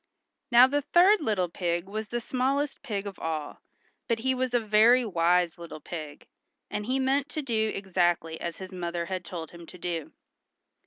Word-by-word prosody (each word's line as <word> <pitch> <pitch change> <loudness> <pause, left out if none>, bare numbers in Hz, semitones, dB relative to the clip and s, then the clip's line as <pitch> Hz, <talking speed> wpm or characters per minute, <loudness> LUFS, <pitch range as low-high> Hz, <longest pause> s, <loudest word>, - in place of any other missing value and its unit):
Now 240 0 +8
the 285 +2 0
third 350 +8 +5
little 210 -9 0
pig 170 0 -2
was 215 +2 -4
the 240 - -2
smallest 270 +4 -1
pig 210 -7 -4
of 200 -2 -7
all, 155 -2 -4 0.5
but 230 - +1
he 260 +3 0
was 255 -1 -1
a - - +5
very 225 +3 +5
wise 175 -3 +2
little 165 -2 -8
pig, 155 -3 -8 0.5
and 210 0 -3
he 260 +1 +1
meant 270 +2 +1
to 305 - -4
do 220 -4 0
exactly 175 -4 0
as 170 -1 -4
his 190 0 -8
mother 170 -2 -3
had 185 +1 -4
told 165 -3 -7
him 170 -1 -12
to 180 - -11
do. 170 -3 -4
200 Hz, 180 wpm, -28 LUFS, 170-255 Hz, 0.5 s, Now